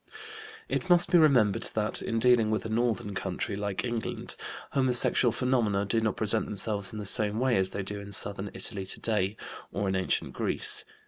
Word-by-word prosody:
It 185 - -3
must 175 0 +4
be 175 - +6
remembered 125 -10 +4
that, 105 -1 0
in 115 - -2
dealing 120 -2 +4
with 110 0 -1
a - - -4
northern 110 -3 -1
country 100 - -3
like 100 +2 -3
England, 120 -2 -2 0.4
homosexual 125 -2 +4
phenomena 110 -6 0
do 115 +3 0
not 110 -1 -1
present 110 0 0
themselves 100 -1 -1
in 110 - -7
the 105 - -5
same 105 0 +1
way 130 -1 +2
as 95 -1 +1
they 100 +1 -4
do 100 +1 -5
in 100 0 -9
southern 100 0 0
Italy 95 -4 -4
today, 105 -1 -1 0.3
or 100 - -2
in 95 - 0
ancient 95 -1 -1
Greece. - - -1
110 Hz, 185 wpm, -28 LUFS, 100-120 Hz, 0.4 s, be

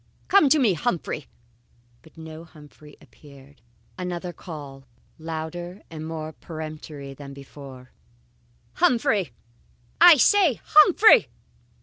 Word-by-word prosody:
Come 385 -8 +5
to 310 - +4
me, 240 -9 +2
Humphrey!" 170 - -3 0.7
But 160 0 -21
no 160 0 -10
Humphrey 150 -2 -17
appeared. 140 -3 -18 0.4
Another 180 -1 -5
call, 140 -7 -11 0.3
louder 165 +3 -7
and 155 -1 -7
more 160 -1 -6
peremptory 155 -4 -9
than 140 0 -11
before: 135 -2 -13 0.9
"Humphrey! 230 - +1 0.7
I 345 -3 +9
say, 355 - +3
Humphrey!" 410 +4 +6
160 Hz, 100 wpm, -23 LUFS, 145-205 Hz, 0.9 s, I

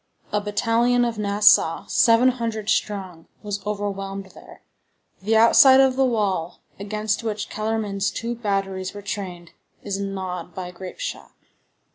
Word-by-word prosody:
A 210 - 0
battalion 230 +4 +1
of 230 -2 -3
Nassau, 205 -5 +4
seven 230 +2 +4
hundred 230 -4 -3
strong, 185 -5 -3 0.2
was 205 -1 -4
overwhelmed 195 -2 -4
there. - - -15 0.6
The 220 +3 +2
outside 260 +4 +7
of 265 -1 +4
the 265 0 +3
wall, 200 -8 -1 0.2
against 210 +2 -2
which 215 -2 -3
Kellermann's 215 -2 -2
two 235 +1 -4
batteries 195 -4 -3
were 205 - -8
trained, 180 -4 -6 0.3
is 200 -1 -3
gnawed 185 -3 -5
by 180 -1 -6
grape 185 +1 -9
shot. - - -6
205 Hz, 135 wpm, -23 LUFS, 195-230 Hz, 0.6 s, outside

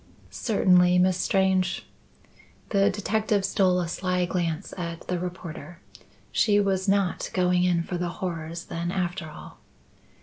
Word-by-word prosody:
"Certainly, 180 -5 +3
Miss 180 0 +3
Strange." 190 -1 +1 0.8
The 200 -1 +3
detective 210 0 0
stole 185 -2 +2
a 175 - -1
sly 180 +1 -1
glance 170 -3 -2
at 170 -2 -6
the 180 -1 -1
reporter. 175 -2 -7 0.5
She 205 -2 +3
was 195 -1 +1
not 195 -2 +1
going 180 -1 +3
in 175 -2 +2
for 175 0 -4
the 175 -1 -1
horrors 170 -3 -4
then 170 +1 -3
after 180 -3 -2
all. 150 - -12
180 Hz, 135 wpm, -26 LUFS, 175-190 Hz, 0.8 s, Certainly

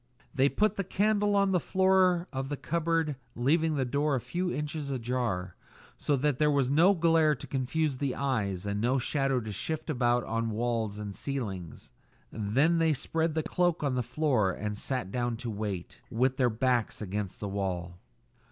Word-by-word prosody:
They 140 -1 +3
put 210 +4 +1
the 195 - 0
candle 205 +2 +1
on 200 -1 +3
the 180 - +3
floor 185 -1 +3
of 135 0 -3
the 145 - -3
cupboard, 165 -2 0 0.2
leaving 155 +6 +2
the 135 -2 0
door 145 +3 +1
a - - 0
few 175 +10 -2
inches 150 -1 -3
ajar, 120 -8 -2 0.4
so 145 - 0
that 140 -1 0
there 150 0 +4
was 140 -3 +2
no 175 +7 +5
glare 165 -2 +4
to 120 - -9
confuse 135 +1 -1
the 140 -3 -1
eyes, 105 -9 -1
and 100 0 -2
no 125 +4 +2
shadow 135 0 0
to 110 -1 -6
shift 155 - -3
about 120 -3 +2
on 115 0 -1
walls 110 -2 -1
and 105 -1 -5
ceiling. 100 - -4 0.6
Then 135 +11 +2
they 160 -1 +3
spread 160 +3 -1
the 160 - 0
cloak 175 -2 0
on 140 -3 +1
the 125 - +1
floor 125 -6 +1
and 105 +2 -4
sat 115 -3 -2
down 120 -1 -1
to 120 -1 -5
wait, 100 -1 -5
with 130 +2 +1
their 125 -2 +3
backs 120 -1 0
against 100 -1 -4
the 105 - -4
wall. 90 -3 -3
130 Hz, 180 wpm, -29 LUFS, 110-160 Hz, 0.6 s, no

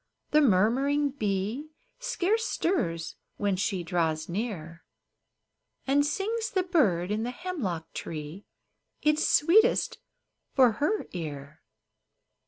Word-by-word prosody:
The 305 - +5
murmuring 270 +6 +3
bee 215 +4 -2 0.3
Scarce 445 -2 0
stirs 170 - -1 0.2
when 205 -2 +1
she 185 -1 -1
draws 160 -3 -1
near, 170 -5 -5 1.0
And 280 +2 +3
sings 435 +9 -1
the 375 -2 0
bird 210 - +2
in 210 +1 0
the 235 - -2
hemlock 245 - -4
tree 155 +4 -7 0.6
Its 300 0 +3
sweetest 430 +11 +4 0.6
for 255 -4 +6
her 400 +8 +1
ear. 150 -3 -7
225 Hz, 105 wpm, -28 LUFS, -, 1.0 s, for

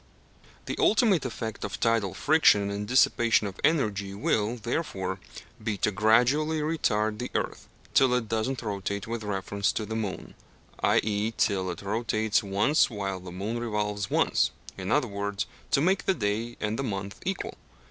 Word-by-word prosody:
The - - -3
ultimate 210 - +4
effect 115 -3 -5
of 100 - -4
tidal 115 -6 +1
friction 105 -10 +4
and 100 +1 -4
dissipation 120 -2 +4
of 100 -1 -6
energy 105 -11 +1
will, 105 +2 0
therefore, 105 - -3 0.4
be 110 -2 -1
to 105 - +1
gradually 125 +10 +3
retard 110 -9 0
the 125 - -3
earth - - -2 0.3
till 130 -2 +5
it 120 -3 -1
does 110 +2 0
not 135 -2 -4
rotate 100 -1 -3
with 115 0 -4
reference 100 0 -1
to 110 - -2
the 110 +2 -5
moon, 105 -4 -4 0.5
i.e. 105 +1 +1
till 95 -3 +1
it 90 - -6
rotates 110 +1 +1
once 105 +9 +2
while 100 -4 -3
the 90 -1 -9
moon 105 +6 -3
revolves 105 -3 -2
once; - - +2 0.3
in - - -4
other - - +3
words, 100 0 -3 0.2
to 135 - +3
make 180 +2 +2
the 190 - +3
day 115 -1 -2
and 110 +2 -2
the - - 0
month 100 -3 -4
equal. 190 +1 -3
110 Hz, 165 wpm, -27 LUFS, 100-120 Hz, 0.5 s, till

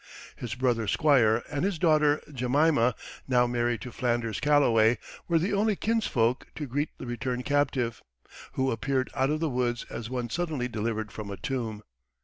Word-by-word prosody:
His 120 -3 -5
brother 120 -3 0
Squire, 120 -4 +3
and 145 0 -3
his 195 -2 0
daughter 150 -2 +3
Jemima 125 -1 +2 0.3
now 125 -2 +4
married 120 -1 0
to 125 - -7
Flanders 120 -3 -1
Calloway 120 -6 +4 0.3
were 170 - +3
the 180 +6 0
only 210 +1 +2
kinsfolk 130 - 0
to 150 - -4
greet 145 +4 -1
the - - -7
returned 125 +1 -3
captive, 140 -5 0 0.5
who 130 0 0
appeared 130 +2 -1
out 135 0 +1
of 155 +1 -1
the 165 - +1
woods 125 -2 -1
as 115 -1 -5
one 125 -2 -3
suddenly 155 -8 -1
delivered 110 -2 -3
from 105 -2 -7
a 100 - -5
tomb. 115 -5 -4
125 Hz, 165 wpm, -28 LUFS, 115-145 Hz, 0.5 s, now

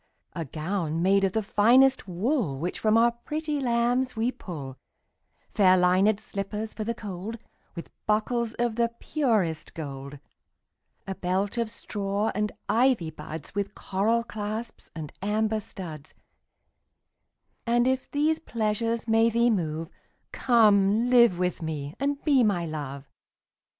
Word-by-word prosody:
A 165 -2 -4
gown 165 +2 -2
made 195 +1 +4
of 190 -1 +1
the 220 - 0
finest 250 +5 +4
wool 190 - -1
Which 170 +6 -3
from 215 0 +3
our 235 +1 +5
pretty 300 +5 -4
lambs 245 0 +1
we 225 +3 0
pull; 140 - -8 0.7
Fair 185 -3 +5
linèd 185 +4 +3
slippers 210 +1 -5
for 215 - -4
the 230 +2 -2
cold, 205 0 -6
15 - - -34 0.3
With 170 - -11
buckles 225 +2 0
of 235 -2 -1
the 235 0 +2
purest 215 - 0
gold. 140 -3 -7 0.9
A 195 - -3
belt 190 +5 -1
of 230 -2 0
straw 205 -1 -2
and 210 +1 -1 0.2
ivy 235 -9 +2
buds 155 -1 -8
With 200 0 -3
coral 220 +5 0
clasps 215 +1 -6
and 155 -3 -7
amber 215 +2 0
studs: 160 -7 -8 1.5
And 240 +1 +3
if 260 0 0
these 305 +2 +1
pleasures 230 -2 -1
may 225 +1 +4
thee 235 +1 +3
move, 165 -5 -2 0.4
Come 220 -1 +4
live 235 -7 +6
with 180 0 -1
me 150 -3 -4
and 280 +1 0
be 275 -5 +4
my 195 -6 +1
Love. 140 -3 -6
210 Hz, 140 wpm, -27 LUFS, 180-235 Hz, 1.5 s, live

